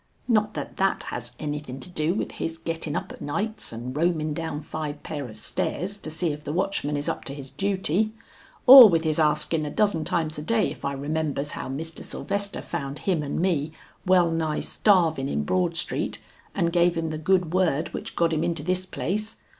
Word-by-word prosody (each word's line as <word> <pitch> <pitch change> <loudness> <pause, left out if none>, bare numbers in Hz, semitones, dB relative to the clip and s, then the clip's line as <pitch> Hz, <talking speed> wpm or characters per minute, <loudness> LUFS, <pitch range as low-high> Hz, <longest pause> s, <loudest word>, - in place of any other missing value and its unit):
Not 215 -3 +2
that - - -5
that 195 0 +1
has 120 0 -6
anything 145 -3 -5
to - - -7
do 165 0 -1
with - - -2
his 165 0 -4
gettin 165 -3 -4
up - - -3
of - - -11
nights 210 +9 -3
and 120 +3 -6
roamin 155 -1 +1
down 160 -1 -4
five 150 -1 -5
pair 145 -5 -5
of 110 - -12
stairs 190 - -2
to 155 - -6
see 160 +1 -1
if 150 0 -7
the 145 - -4
watchman 165 -4 0
is 145 - -3
up - - -2
to 140 - -4
his 135 -2 -9
duty, 195 +1 +1 0.5
or 255 -3 +12
with 165 -2 +2
his 155 -1 0
askin 155 +1 +2
a 150 - -3
dozen 190 -2 +1
times 155 -2 -1
a - - -4
day 215 +6 +1
if - - -11
I 140 - -1
remembers 145 0 -2
how - - -5
Mr. 160 +5 -5
Sylvester 200 0 -3
found 140 +1 -4
him 180 -5 +2
and 145 +1 -3
me, 160 -4 0 0.3
well 180 -2 +4
nigh 160 -2 -1
starvin 165 -9 +2
in 75 - -1
Broad 175 - 0
Street, - - -1 0.4
and 170 -3 +1
gave 175 0 +4
him 165 -1 -1
the 155 - -4
good 180 0 +2
word 170 -4 +1
which - - -6
got 165 -1 +2
him 155 0 0
into 170 -3 -1
this 185 +2 -1
place? 210 +5 -3
160 Hz, 205 wpm, -25 LUFS, 150-185 Hz, 0.5 s, or